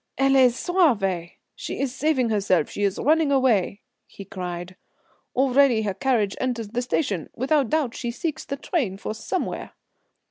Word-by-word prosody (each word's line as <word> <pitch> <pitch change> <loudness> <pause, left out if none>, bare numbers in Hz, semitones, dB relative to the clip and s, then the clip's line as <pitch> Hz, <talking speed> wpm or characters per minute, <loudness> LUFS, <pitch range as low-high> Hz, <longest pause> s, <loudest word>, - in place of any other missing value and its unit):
"Elle 270 +1 +3 0.2
se 240 - -7
sauve. 205 - +1 0.3
She - - -6
is 270 -3 -1
saving 265 -4 +1
herself; 195 -6 +1
she - - -5
is 200 -2 +1
running 310 +1 +2
away," 230 -8 +2 0.3
he 200 - -11
cried. 180 -1 -6 0.6
"Already 260 -3 +4
her 200 -2 -1
carriage 210 -2 0
enters 240 -4 -2
the 240 +3 -2
station 245 - -1
without 270 0 +1
doubt 295 -7 0
she 240 - -4
seeks 310 +6 -4
the 275 - -5
train 260 - -2
for 215 - -5
somewhere." 360 - -4
245 Hz, 155 wpm, -24 LUFS, 200-275 Hz, 0.6 s, Already